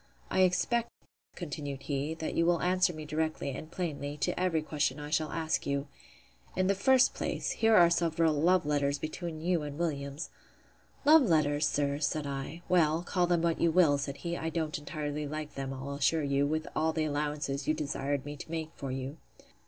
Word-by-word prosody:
I - - +1
expect, 205 +6 +2 0.5
continued 145 -5 -5
he, 145 +2 -2
that 160 -1 -4
you 165 - +2
will 170 0 +3
answer 180 0 +3
me 155 -2 -7
directly, 155 -2 -2
and 155 +4 -7
plainly, 150 -5 -4
to - - 0
every 175 -4 +1
question 150 -2 -1
I 150 0 -7
shall 155 0 +1
ask 160 -1 -1
you.—In 140 - -5
the 195 - +3
first 260 +6 +4
place, - - -2
here 225 0 +3
are 170 -3 +7
several 165 -1 +2
love 170 +3 +3
letters 145 -1 +1
between 155 +2 -5
you 175 0 +1
and 145 -1 -6
Williams. 145 -3 -3 0.7
Love 310 +2 +8
letters! 150 - +2
sir, 140 -1 0
said 150 0 -1
I.—Well, 160 +4 0
call 180 0 +1
them 175 -1 +2
what 165 -1 +1
you 170 - +4
will, 160 -4 +4
said 140 0 -4
he, 170 +4 -3
I 165 -1 -2
don't 160 -2 -2
entirely 150 0 -4
like 155 0 -5
them, 135 -1 -4
I'll 135 +1 -5
assure 145 +3 +1
you, 140 0 +2
with 155 +1 -1
all 160 +1 +1
the 160 - 0
allowances 145 -1 -2
you 155 - +2
desired 140 -2 -2
me 145 0 -5
to 140 - -9
make 160 -1 -4
for 135 - -6
you. 135 +3 -4
155 Hz, 190 wpm, -30 LUFS, 145-170 Hz, 0.7 s, Love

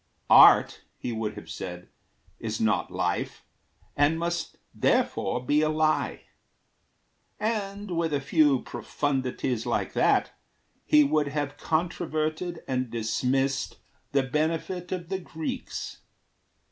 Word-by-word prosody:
`Art,' - - +8 0.2
he 125 - -4
would 110 -2 -3
have 105 - -10
said, 90 -1 -7 0.5
`Is 110 -1 -3
not 110 -1 +1
life, - - -2 0.5
and 145 +3 +3
must 170 +1 -3 0.2
therefore 125 - +1
be 145 +3 +3
a 155 - +2
lie;' 155 0 0 1.2
And 205 -2 -2
with 165 -1 0
a 145 - +1
few 140 -1 +3
profundities 130 -4 -2
like - - -1
that - - +3 0.5
He 150 0 +6
would 150 +1 +1
have 145 -1 -3
controverted 160 +1 -2
and 130 -2 -1
dismissed 125 +4 -1 0.3
The 140 -1 +2
benefit 165 +6 -2
of 175 -3 -4
the 190 - -2
Greeks. 160 -3 -5
150 Hz, 115 wpm, -27 LUFS, 130-165 Hz, 1.2 s, `Art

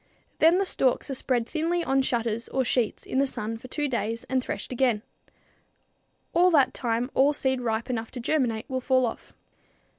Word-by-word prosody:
Then 330 +3 +6
the 390 - +1
stalks 265 -4 +1
are - - -1
spread 250 -2 0
thinly 335 +5 -1
on 270 -2 +2
shutters 235 -3 -1
or 265 -1 0
sheets 235 -2 0
in 260 - -1
the 275 - +3
sun 225 -3 -4
for 255 - -11
two 295 +3 -2
days 230 -3 -2
and 260 -1 -1
threshed - - -5
again. 245 -4 +1 1.3
At 360 +2 +5
that 275 -4 +4
time 240 +1 -1
all 280 +3 +4
seed 265 -3 0
ripe 225 -1 -1
enough 225 -3 -3
to 250 - -5
germinate 240 -4 0
will 260 -2 -3
fall 255 0 +3
off. 225 - -6
255 Hz, 185 wpm, -26 LUFS, 235-275 Hz, 1.3 s, Then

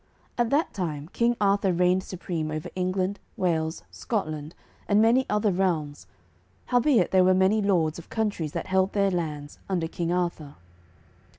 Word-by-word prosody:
At 240 -2 +1
that 295 +5 +1
time 155 -6 -4
King 235 0 +1
Arthur 200 -1 +2
reigned 180 +1 +2
supreme 170 -4 -4
over 155 0 -4
England, 185 +2 -1 0.2
Wales, 160 -3 -1
Scotland, 155 -8 -4 0.3
and 205 0 +3
many 235 +4 +4
other 210 0 +2
realms, 170 -6 -1 0.6
howbeit 245 - +3
there 185 -1 +5
were 185 0 +4
many 190 +3 +3
lords 170 -6 +1
of 170 - -13
countries 205 -9 -2
that - - -3
held 190 0 +1
their 200 -1 +2
lands 150 -5 -4
under 175 -4 0
King 170 0 -3
Arthur. 170 -5 -2
185 Hz, 155 wpm, -26 LUFS, 160-205 Hz, 0.6 s, there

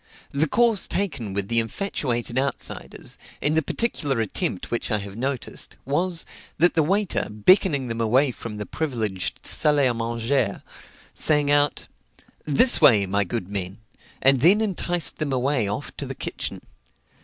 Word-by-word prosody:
The 145 +3 +1
course 225 +1 +2
taken 140 - -2
with 100 0 -2
the 115 +1 +4
infatuated 120 - -2
outsiders, 140 +1 -4 0.2
in 150 - +1
the 160 - +3
particular 145 - -1
attempt 105 -3 -3
which 120 - -2
I 105 - +2
have 100 -1 -7
noticed, 130 +2 -4
was, 165 +5 -1 0.3
that 175 +3 +4
the 165 - +3
waiter, 195 +5 0
beckoning 140 - +3
them 115 -1 -4
away 130 +5 +3
from 115 -3 -8
the 105 - -5
privileged 110 - -3
salle 150 -1 +2
à 130 -4 +2
manger, 115 0 -1 0.5
sang 150 -2 +2
out, 145 0 +1 0.6
"This 155 - +5
way, 105 -6 +7
my 100 +2 +1
good 95 0 -4
men;" 95 -1 -4 0.5
and 135 0 +5
then 180 - +5
enticed 175 -5 0
them 150 -2 -2
away 130 -3 0
off 100 - -5
to - - -4
the - - -6
kitchen. - - -5
135 Hz, 155 wpm, -24 LUFS, 110-155 Hz, 0.6 s, way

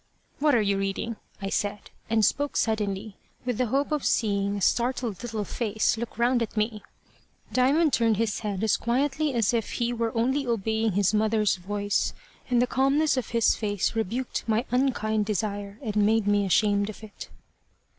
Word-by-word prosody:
"What 295 -2 +3
are 230 - +4
you 200 -1 +1
reading?" 195 +3 -3 0.3
I 195 - -3
said, 205 0 -2 0.2
and 220 -1 +3
spoke 290 +6 0
suddenly, 210 -2 -1 0.3
with 245 -2 -2
the 250 - +2
hope 275 +6 0
of 300 -3 0
seeing 200 -2 +1
a - - -5
startled 235 -3 0
little 225 -3 -3
face 220 +1 0
look 225 -1 -6
round 240 +1 +2
at 225 -1 -4
me. 215 0 -1 0.7
Diamond 280 +5 +3
turned 225 -3 +3
his 220 -2 0
head 205 -2 -3
as 220 - +3
quietly 275 +4 0
as 230 -1 +2
if 230 -2 -1
he 240 0 -1
were 230 -1 -1
only 265 +4 +1
obeying 220 -1 0
his 200 +1 +2
mother's 215 -1 +2
voice, 205 +2 -1 0.3
and 245 -1 +3
the 245 - +4
calmness 275 +4 +2
of 255 -4 -3
his 230 -1 +3
face 205 -1 -1
rebuked 230 +4 -2
my 225 +2 +1
unkind 220 -5 +1
desire 205 -1 -3
and 215 -4 -3
made 215 +1 +3
me 205 -1 +2
ashamed 205 +1 +2
of 215 - -10
it. 215 - -10
220 Hz, 175 wpm, -26 LUFS, 205-245 Hz, 0.7 s, are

